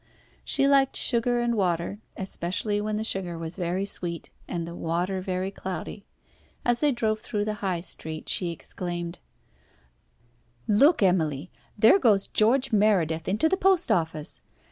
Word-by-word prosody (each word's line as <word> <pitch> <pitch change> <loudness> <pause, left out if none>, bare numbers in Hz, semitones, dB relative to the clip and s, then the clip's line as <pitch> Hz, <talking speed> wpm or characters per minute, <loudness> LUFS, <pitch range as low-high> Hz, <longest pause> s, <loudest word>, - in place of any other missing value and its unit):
She 275 - +2
liked 275 -1 +3
sugar 240 0 +2
and 240 0 +1
water, 185 -1 -1 0.2
especially 195 +2 -2
when 210 0 -2
the 215 - -2
sugar 185 -6 -1
was 165 +1 -6
very 180 +1 -2
sweet, 175 -4 -4 0.2
and 170 -2 -3
the 170 - -7
water 175 +3 -2
very 185 +1 -2
cloudy. 190 +1 -6 0.6
As 240 0 +2
they 295 -1 +3
drove 220 -3 0
through 210 -2 -3
the 215 - -1
High 185 -4 -1
Street, 160 -3 -3
she 180 - +1
exclaimed 175 +1 -6 1.5
"Look, 275 - +4
Emily, 165 -4 +1 0.3
there 220 - +6
goes 210 - +3
George 255 +5 +2
Meredith 180 -7 +2
into 210 +11 +2
the 380 - +2
post 380 -2 +3
office. 160 -3 -2
195 Hz, 145 wpm, -26 LUFS, 170-220 Hz, 1.5 s, there